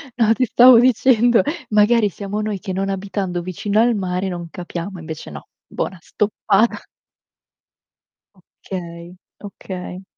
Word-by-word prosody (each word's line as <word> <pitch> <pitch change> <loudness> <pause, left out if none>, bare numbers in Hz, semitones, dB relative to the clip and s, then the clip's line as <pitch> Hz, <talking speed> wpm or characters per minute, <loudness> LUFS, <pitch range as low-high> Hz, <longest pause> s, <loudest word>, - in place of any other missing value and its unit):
No, 225 -2 +3
ti 255 +2 0
stavo 245 +1 +7
dicendo, 245 -1 +4 0.3
magari 210 +1 +3
siamo 200 +2 -5
noi 210 -2 -3
che 190 -1 -5
non 195 +1 -2
abitando 195 -2 -3
vicino 200 +4 -2
al 235 0 +3
mare 185 -1 -2
non 175 -2 -6
capiamo, 175 +2 -7
e - - -9
invece 160 -1 -8
no. 70 -1 -10 0.2
Buona 185 - -4
stoppata. 210 +3 0 1.8
Okay, 170 -1 -7 0.3
okay. 185 -2 -8
195 Hz, 130 wpm, -20 LUFS, 180-215 Hz, 1.8 s, stavo